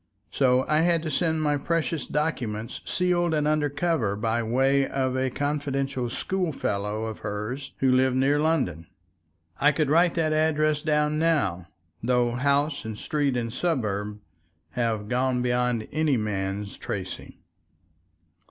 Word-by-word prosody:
So 130 -1 +3
I 155 0 +3
had 165 -1 +2
to 155 - -3
send 160 +1 0
my 145 -1 +2
precious 165 0 -1
documents 120 -8 -2
sealed 175 -2 +1
and 150 -1 +1
under 150 -1 +2
cover 145 -9 0
by 115 +2 0
way 135 +4 +2
of 130 -1 -1
a 130 0 +1
confidential 140 -2 -2
schoolfellow 110 - -2
of 110 -1 -5
hers 105 +7 -5
who 135 -1 +4
lived 130 0 +3
near 135 +3 +3
London.... 95 - 0 0.7
I 145 +2 +5
could 150 -2 0
write 170 +2 +4
that 160 -2 +1
address 155 -1 +2
down 150 0 +1
now, 135 - +1 0.3
though 120 0 +2
house 140 +4 +1
and 110 -1 -6
street 145 -2 0
and 115 -1 -3
suburb 105 - -1 0.5
have 115 -4 -1
gone 125 +1 +1
beyond 125 -2 0
any 155 -4 +2
man's 100 -2 -3
tracing. - - -6
135 Hz, 140 wpm, -26 LUFS, 115-155 Hz, 0.7 s, I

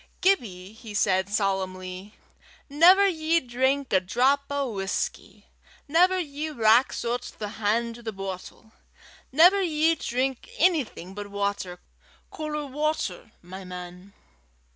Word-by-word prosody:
"Gibbie," 215 - 0
he 220 -2 -10
said, 190 -2 +2
solemnly, 190 -1 -3 0.5
"never 360 +7 +6
ye 330 -2 +1
drink 260 +1 -1
a 190 - +6
drap 250 +9 +2
o' 280 -3 -2
whusky. 195 -2 -4 0.4
Never 360 +5 +4
ye 310 -2 -4
rax 235 -2 +3
oot 240 +1 -3
the 210 - -4
han' 230 +3 +1
to 240 - -12
the 225 -1 -5
boatle. 195 +2 -8 0.6
Never 355 +8 +6
ye 325 -2 +2
drink 260 -3 -2
onything 290 - +1
but 205 0 -7
watter, 200 -3 -3 0.5
caller 300 -1 -4
watter, 280 - -3
my 190 +2 -9
man." 180 +1 -9
235 Hz, 120 wpm, -26 LUFS, 195-300 Hz, 0.6 s, never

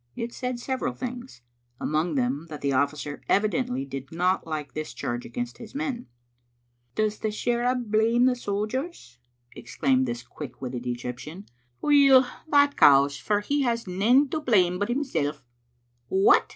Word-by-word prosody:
It 235 +1 -4
said 250 -1 -3
several 260 +1 -2
things, 245 - -7 0.4
among 155 +1 -1
them 135 +5 -1
that 150 -2 -8
the 140 - 0
ojB&cer 145 +2 -1
evidently 250 +5 +1
did 135 - -7
not 180 +2 0
like 150 -3 -4
this 155 0 -5
charge 120 0 -4
against 120 +1 -5
his 230 +2 -11
men. 275 -5 -3 0.4
" 120 0 -45
Does 215 -1 0
the - - -1
shirra 240 +3 0
blame 230 0 +2
the 255 - +4
sojers?" 215 - -4 0.4
exclaimed 130 -1 0
this 120 0 -4
quick 130 +2 -9
witted 125 -1 -5
Egyptian. 125 +9 -6 0.2
" 120 -1 -43
Weel, 275 -3 +6 0.2
that 285 -1 +4
cows, 140 0 +6
for 210 -1 0
he 285 +7 0
has 235 -3 0
nane 220 +10 +3
to 315 - -2
blame 185 -10 +2
but 205 - -1
himseV." 155 - -1 0.6
"What!" 190 +6 +4
195 Hz, 155 wpm, -26 LUFS, -, 0.6 s, Weel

